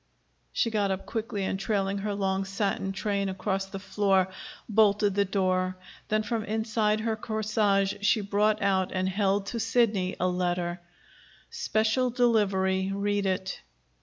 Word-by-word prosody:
She 230 - 0
got 205 -2 +1
up 190 0 -3
quickly, 215 -3 -3
and, 190 0 -2
trailing 195 0 0
her 205 0 -2
long 195 -1 0
satin 195 0 -2
train 200 0 -1
across 195 +1 -2
the 195 - -7
floor, 195 -1 +1 0.4
bolted 210 -2 +3
the 200 +1 +2
door. 185 -1 0 0.3
Then 215 0 +1
from 225 0 -2
inside 215 -1 0
her 220 0 0
corsage 215 -3 +1
she 210 +1 +3
brought 210 +1 +1
out 190 -2 +1
and 185 0 -1
held 195 +1 +1
to 230 - -2
Sidney 220 -5 +1
a 185 - +2
letter. 175 -1 -1 0.7
"Special 220 +4 +1
delivery. 195 -6 +2
Read 200 0 0
it." 185 -1 -2
200 Hz, 145 wpm, -28 LUFS, 190-215 Hz, 0.7 s, bolted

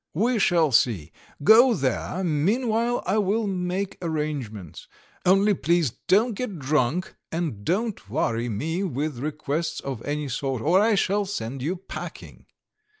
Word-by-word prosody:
"We 230 +6 +2
shall 170 -6 +3
see. 105 - +2 0.3
Go 230 - +7
there; 145 +6 -1
meanwhile 225 - +1
I 195 +4 +1
will 210 +3 +1
make 185 0 -2
arrangements. 145 - -4 0.4
Only 195 +3 +5
please 170 - +1 0.2
don't 220 +5 +4
get 210 -3 -4
drunk, 150 +4 0 0.2
and 160 -12 -3
don't 195 - -2
worry 115 -2 -1
me 160 - -2
with 150 -5 -3
requests 155 +2 -2
of 135 -5 -5
any 145 0 -2
sort, 130 -2 -2
or 175 +5 +4
I 220 0 +3
shall 200 +1 +1
send 135 - -4
you 165 +8 -1
packing." 190 +1 -9
165 Hz, 140 wpm, -25 LUFS, 135-200 Hz, 0.4 s, Go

